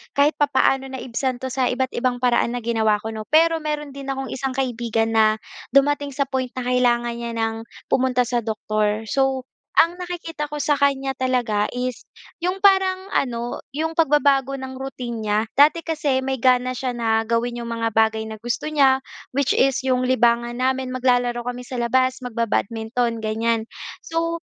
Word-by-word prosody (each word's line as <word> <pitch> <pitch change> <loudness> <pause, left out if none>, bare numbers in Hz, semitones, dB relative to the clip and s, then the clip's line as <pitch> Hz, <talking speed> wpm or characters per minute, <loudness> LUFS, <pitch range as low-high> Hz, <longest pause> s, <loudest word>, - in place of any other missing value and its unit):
kahit 285 +1 +3
papaano 270 -1 +2
naibsan 260 0 -3
‘to 260 - -3
sa 260 -1 +1
iba't 260 +1 -1
ibang 250 0 0
paraan 245 0 +2
na 240 - -4
ginawa 220 -2 +2
ko, 220 - -4
‘no. 215 -1 -7
Pero 325 +1 +4
meron 300 -2 -3
din 275 0 -9
akong 270 -1 -3
isang 265 0 -3
kaibigan 230 -3 -1
na 215 -1 +4 0.4
dumating 285 0 +3
sa 280 - +2
point 260 -1 -2
na 255 - -3
kailangan 240 -1 +2
niya 235 -1 -5
ng 225 0 -2 0.2
pumunta 250 -1 +2
sa 240 0 -1
doktor. 215 -1 -1
So, 265 +2 0 0.4
ang 340 +1 +4
nakikita 330 -4 -5
ko 295 - -4
sa 290 0 +2
kanya 275 -1 +1
talaga 245 -5 0
is 250 -1 -3 0.4
yung 365 +2 0
parang 380 -1 +3
ano, 240 -2 -1
yung 320 +3 -2
pagbabago 280 -3 +3
ng 260 0 -7
routine 245 -4 -5
niya. 210 0 +2 0.2
Dati 300 +4 +6
kasi 300 -5 0
may 265 0 -2
gana 255 0 +3
siya 255 0 -2
na 225 -2 +1
gawin 235 +1 -1
yung 235 0 -5
mga 230 0 -1
bagay 220 0 +2
na 220 - -6
gusto 240 +6 -3
niya, 275 -3 +4 0.3
which 275 0 +1
is 270 0 +3
yung 255 -1 +1
libangan 240 -1 +2
namin, 260 0 0
maglalaro 245 -1 +1
kami 245 0 -4
sa 245 0 -5
labas, 255 +2 +1
mag-babadminton, 230 -1 -1
ganyan. 225 +1 0 0.4
So, 335 +1 -2
255 Hz, 170 wpm, -22 LUFS, 235-275 Hz, 0.4 s, Dati